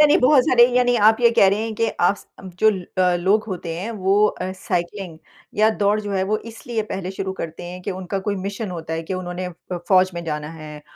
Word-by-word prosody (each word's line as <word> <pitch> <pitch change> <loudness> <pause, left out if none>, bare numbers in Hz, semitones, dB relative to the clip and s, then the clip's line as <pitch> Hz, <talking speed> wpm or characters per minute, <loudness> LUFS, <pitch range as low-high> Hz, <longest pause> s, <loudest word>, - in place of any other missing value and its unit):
यानी 295 -1 +6
बहुत 260 +1 +5
सारे 240 -1 +6
यानी 245 0 +3
आप 220 - +4
ये 235 -1 +6
कह 195 - +7
रहे 205 +3 +1
हैं 225 -1 -4
कि 230 +1 0
आप 190 +1 -1
जो 220 - +6 0.3
अ, 180 -1 +3
लोग 195 +5 +2
होते 170 -3 -4
हैं 200 +6 -4
वो 200 0 +3
अ, 185 -3 -3
साइकिलिंग 180 -1 -4 0.4
या 215 +1 +4
दौड़ 205 +1 +3
जो 205 -1 -5
है 190 - +1
वो 215 +2 0 0.2
इसलिए 230 -1 -4
पहले 190 -1 -4
शुरू 190 0 -4
करते 165 +1 -6
हैं 180 +1 -7
कि 200 - -3
उनका 190 +1 -4
कोई 200 -1 0
मिशन 200 +2 -4
होता 165 -2 -6
है 165 - -3
कि 175 +4 -4
उन्होंने 180 0 -4 0.4
फौज 185 -1 +5
में 170 - -4
जाना 150 -1 -4
है। 155 -2 -10
190 Hz, 225 wpm, -21 LUFS, 175-215 Hz, 0.4 s, कह